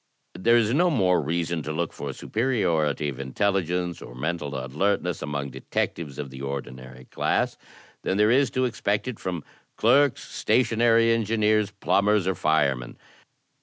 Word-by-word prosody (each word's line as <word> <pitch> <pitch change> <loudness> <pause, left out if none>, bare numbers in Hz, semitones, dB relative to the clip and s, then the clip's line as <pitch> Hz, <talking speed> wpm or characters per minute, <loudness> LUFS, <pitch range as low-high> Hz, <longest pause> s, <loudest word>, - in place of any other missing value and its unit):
"There 115 +5 +3
is 115 0 +2
no 175 +5 +4
more 95 - +2
reason 85 +2 -1
to 75 - -5
look 80 +2 -2
for - - -5
superiority 85 - 0
of 65 - -7
intel 80 +10 0
ligence 90 0 -3
or 60 - -11
mental 75 +1 -3
alertness 85 +6 -1
among 70 -2 -3
detectives 75 0 -3
of 70 -3 -5
the 65 0 -9
ordinary 65 -2 -7
class - - 0 0.5
than 95 - -1
there 105 +2 +4
is 135 +1 +4
to 130 - +3
expect 105 -2 -1
it 125 -4 -5
from 90 -5 -4 0.3
clerks, 140 -1 +3
stationary 115 -1 +3
engi 115 0 -1
neers, 105 -1 +2
plumbers, 105 -1 +2
or 95 - +1
firemen. 75 -8 0
90 Hz, 155 wpm, -25 LUFS, 75-110 Hz, 0.5 s, no